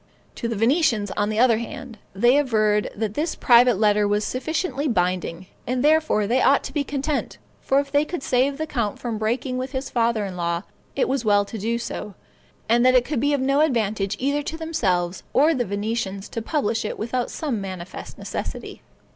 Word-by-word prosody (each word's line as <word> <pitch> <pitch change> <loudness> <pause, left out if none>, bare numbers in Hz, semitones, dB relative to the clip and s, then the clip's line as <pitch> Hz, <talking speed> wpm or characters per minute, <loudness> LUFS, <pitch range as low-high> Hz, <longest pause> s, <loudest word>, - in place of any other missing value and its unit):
To 235 - -4
the 230 - -2
Venetians, 230 - +2
on 205 0 -1
the 215 - -2
other 230 -2 +4
hand, 235 -1 -8 0.2
they 240 +7 +4
averred 215 -6 +1
that 210 -1 -2
this 310 +7 -1
private 240 -2 +5
letter 210 0 +3
was 205 +1 +1
sufficiently 295 +1 -2
binding, 180 -4 -1 0.2
and 250 +1 0
therefore 310 -9 +3
they 245 +5 +2
ought 280 - +4
to 270 - -7
be 295 -1 0
content; 280 +1 -2 0.2
for 270 - +2
if 280 0 -3
they 290 +1 +3
could 325 -1 -5
save 265 +3 +1
the 315 - -2
count 235 -9 -2
from 230 -3 -4
breaking 255 +4 -1
with 260 +2 -5
his 265 0 -4
father 230 -3 +1
in 190 -2 -6
law, 170 0 -2 0.3
it 275 - +1
was 265 -2 -1
well 205 -2 +3
to 225 - -7
do 230 +4 -1
so, 210 -4 -6 0.5
and 235 +2 +3
that 255 0 +5
it 245 -1 +4
could 295 -4 -2
be 285 +3 +1
of 280 - +1
no 275 +2 +2
advantage 215 -9 0
either 280 +3 0
to 315 +2 -5
themselves 190 - -1
or 300 +5 +4
the 250 -5 -1
Venetians 200 -1 -3
to 230 - -4
publish 230 -4 -1
it 215 - -4
without 240 +3 -2
some 270 -10 -3
manifest 185 -2 -7
necessity. - - -6
235 Hz, 200 wpm, -23 LUFS, 210-275 Hz, 0.5 s, private